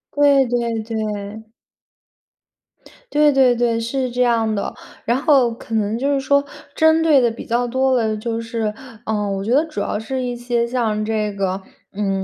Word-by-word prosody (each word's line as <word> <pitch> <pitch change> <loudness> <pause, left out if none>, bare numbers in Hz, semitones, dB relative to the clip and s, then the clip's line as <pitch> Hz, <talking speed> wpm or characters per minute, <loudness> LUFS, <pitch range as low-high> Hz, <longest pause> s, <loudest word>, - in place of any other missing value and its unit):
对， 285 -2 +5
对， 235 -2 -1
对。 215 0 -5 1.6
对， 300 0 +4
对， 260 -3 +4
对， 235 -1 +1
是 250 +3 -2
这 250 +1 -1
样 230 -3 +2
的。 200 - -3 0.3
然 235 +2 +2
后 275 -5 +3
可 225 -1 -7
能 215 0 0
就 280 +4 0
是 275 - +1
说 280 +1 +2 0.3
针 320 0 +4
对 295 -5 +5
的 240 - +3
比 225 - -9
较 240 +1 0
多 260 +1 +1
的 220 -3 +1
就 230 +1 -3
是 230 -2 -3 0.3
呃， 210 -2 -1
我 195 - -4
觉 225 - -2
得 290 +6 +4
主 305 - -6
要 210 - -2
是 255 +3 -3
一 245 -1 -3
些 240 -1 -1
像 225 -4 -1
这 215 -2 -1
个 195 -1 -2 0.3
嗯， 195 -1 -1
235 Hz, 190 characters per minute, -20 LUFS, 220-260 Hz, 1.6 s, 对